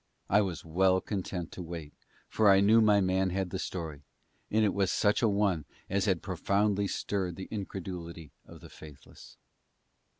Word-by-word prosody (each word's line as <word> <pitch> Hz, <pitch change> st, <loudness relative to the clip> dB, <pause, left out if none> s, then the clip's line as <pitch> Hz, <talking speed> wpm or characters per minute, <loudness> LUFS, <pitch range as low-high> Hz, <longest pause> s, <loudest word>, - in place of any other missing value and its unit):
I 100 Hz, +2 st, +5 dB
was 90 Hz, -6 st, -4 dB
well 95 Hz, +3 st, +3 dB
content 95 Hz, -4 st, -4 dB
to -, -, -8 dB
wait, 85 Hz, -3 st, -7 dB, 0.3 s
for 110 Hz, -2 st, +3 dB
I 95 Hz, 0 st, +7 dB
knew 110 Hz, +3 st, +5 dB
my 105 Hz, -2 st, +5 dB
man 95 Hz, 0 st, +1 dB
had 95 Hz, 0 st, -2 dB
the 95 Hz, -, -3 dB
story, 80 Hz, -7 st, -5 dB, 0.5 s
and 110 Hz, 0 st, +3 dB
it 100 Hz, -, +1 dB
was 100 Hz, -2 st, +1 dB
such 105 Hz, 0 st, +2 dB
a 115 Hz, -, +3 dB
one 100 Hz, -6 st, +1 dB, 0.3 s
as 100 Hz, -1 st, +1 dB
had 95 Hz, -4 st, 0 dB
profoundly 100 Hz, +2 st, 0 dB
stirred 95 Hz, -3 st, -2 dB
the 95 Hz, -, -7 dB
incredulity 90 Hz, -6 st, -6 dB
of -, -, -14 dB
the -, -, -12 dB
faithless. 75 Hz, -3 st, -14 dB
95 Hz, 170 wpm, -30 LUFS, 85-100 Hz, 0.5 s, I